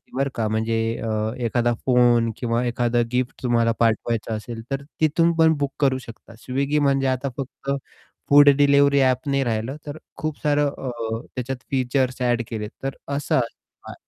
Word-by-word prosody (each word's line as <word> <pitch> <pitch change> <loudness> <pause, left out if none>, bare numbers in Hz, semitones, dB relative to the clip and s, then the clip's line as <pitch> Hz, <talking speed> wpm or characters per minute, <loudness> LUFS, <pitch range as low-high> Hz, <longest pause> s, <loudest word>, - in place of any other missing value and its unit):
बरं 135 +1 0
का! 110 -2 -1
म्हणजे 110 +1 0 0.3
अ, - - -2 0.4
एखादा 120 +1 +1
फोन 120 -2 +4
किंवा 120 0 -1
एखादा 120 0 +1
गिफ्ट 125 +1 -2
तुम्हाला 115 -2 +2
पाठवायचा 115 0 0
असेल 115 +1 -6
तर 135 0 -2 0.2
तिथून 165 +2 +3
पण 160 0 +6
बुक 140 -1 -1
करू 135 -2 +2
शकता 115 0 -12
Swiggy 140 +3 0
म्हणजे 135 -1 +2
आता 130 +1 -1
फक्त 135 0 -5 0.6
फूड 145 0 +8
डिलिव्हरी 140 0 +4
ॲप 130 +1 +1
नाही 140 0 +1
राहिलं 115 +4 -2
तर 145 +1 -6 0.2
खूप 155 -1 -4
सारं 145 -1 +2
अ, 135 -2 -5 0.4
त्याच्यात 130 0 -4
फीचर्स 130 -1 0
एड 120 -1 +1
केले 105 -2 -4
तर 135 0 -3 0.2
असं 145 - -2
आहे. 120 -3 -5
130 Hz, 160 wpm, -23 LUFS, 120-140 Hz, 0.6 s, फूड